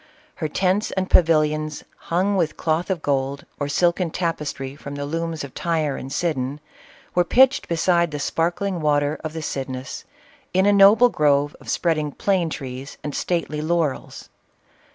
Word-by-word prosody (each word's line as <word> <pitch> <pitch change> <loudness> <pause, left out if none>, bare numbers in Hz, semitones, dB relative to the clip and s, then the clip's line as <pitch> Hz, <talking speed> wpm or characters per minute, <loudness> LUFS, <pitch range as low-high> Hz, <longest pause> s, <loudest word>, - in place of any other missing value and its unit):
Her 155 - -2
tents 190 +6 +1
and 190 -1 -3
pavilions, 155 -2 +3
hung 185 +4 0
with 170 -5 0
cloth 160 +3 0
of 180 -4 -2
gold, 140 0 -1
or 145 -1 -2
silken 175 +3 +1
tapestry 150 -6 -3
from 145 -1 -8
the 145 0 -4
looms 165 +1 -3
of 140 - -8
Tyre 160 -5 -1
and 135 - -7
Sidon, 145 -4 -1 0.5
were 175 - +3
pitched 265 +9 +4
beside 170 0 +2
the 150 - -5
sparkling 170 +4 -1
waters 145 0 +1
of 155 -1 -4
the 160 -1 -5
Cydnus, 130 -2 -5 0.5
in 190 +1 +4
a 205 - +5
noble 205 +5 +7
grove 145 -4 +2
of - - -11
spreading 155 -4 0
plane 185 0 0
trees 135 -2 -7
and 150 - -4
stately 165 -3 -2
laurels. 160 -3 -2
160 Hz, 155 wpm, -22 LUFS, 145-175 Hz, 0.5 s, noble